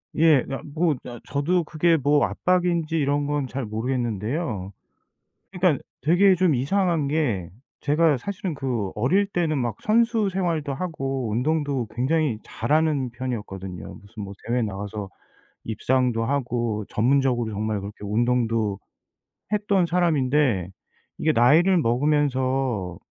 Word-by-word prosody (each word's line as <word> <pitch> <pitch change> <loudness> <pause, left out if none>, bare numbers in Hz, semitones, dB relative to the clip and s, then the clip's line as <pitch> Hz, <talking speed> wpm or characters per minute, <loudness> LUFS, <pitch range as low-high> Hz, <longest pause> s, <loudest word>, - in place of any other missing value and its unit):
예. 155 -4 +5
그러니까 135 - -6
뭐 160 -2 +2
아 120 -1 -8
저도 170 +5 +1
그게 165 +2 +2
뭐 145 +1 +3
압박인지 175 -3 0
이런 145 0 +1
건 145 -2 -1
잘 135 0 -4
모르겠는데요. 110 - -2 0.8
그러니까 180 -6 +1 0.2
되게 185 +6 +5
좀 180 -4 +2
이상한 165 +3 +1
게 120 - -1 0.3
제가 150 0 +3
사실은 190 0 -4
그 120 -8 -2
어릴 180 - +2
때는 170 -6 -1
막 120 -3 -2
선수 225 -1 +2
생활도 170 -7 -1
하고 135 -8 -3
운동도 140 0 0
굉장히 130 -1 +1
잘하는 150 -4 0
편이었거든요. 105 -8 -6
무슨 105 +2 -11
뭐 100 +1 -8
대회 120 +1 +1
나가서 105 0 -4 0.6
입상도 120 +1 0
하고 120 -5 -1
전문적으로 125 -1 +1
정말 105 0 -2
그렇게 100 +1 -8
운동도 115 -2 +1 0.8
했던 200 -3 +2
사람인데 145 - +1 0.5
이게 155 - +2
나이를 160 +11 +5
먹으면서 130 - 0
135 Hz, 290 characters per minute, -24 LUFS, 115-160 Hz, 0.8 s, 예